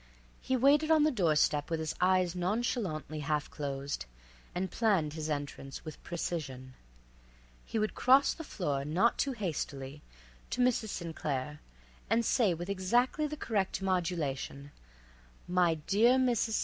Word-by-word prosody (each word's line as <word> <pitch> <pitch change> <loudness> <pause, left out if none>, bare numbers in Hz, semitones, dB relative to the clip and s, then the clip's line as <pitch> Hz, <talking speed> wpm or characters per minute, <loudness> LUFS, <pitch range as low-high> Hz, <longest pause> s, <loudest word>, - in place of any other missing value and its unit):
He 260 - 0
waited 285 +5 +4
on 315 -2 +5
the 305 - +4
door 175 - +2
step 150 -1 +2
with 165 -1 -1
his 160 0 -2
eyes 185 -1 +3
nonchalantly 180 -5 -2
half 150 0 -1
closed, 140 - -4 0.5
and 185 +1 -2
planned 190 -10 +1
his 155 0 -4
entrance 145 -1 -5
with 155 - -8
precision. 140 -7 -4 0.9
He - - -3
would 215 0 0
cross 265 +3 +5
the 325 - -8
floor, 145 - -2
not 175 +11 +2
too 275 - +1
hastily, 150 - -4 0.5
to - - -4
Mrs. 245 -3 +2
St. 170 -4 -5
Claire, 145 +1 -3 0.5
and 225 +2 +2
say 215 -9 +3
with 175 +2 -6
exactly 240 +10 +1
the 300 +1 -6
correct 205 -8 -1
modulation: 160 -6 -2 0.8
"My 180 -2 +3
dear 205 +10 +3
Mrs. 240 -3 +1
St. - - +2
180 Hz, 150 wpm, -31 LUFS, 150-230 Hz, 0.9 s, on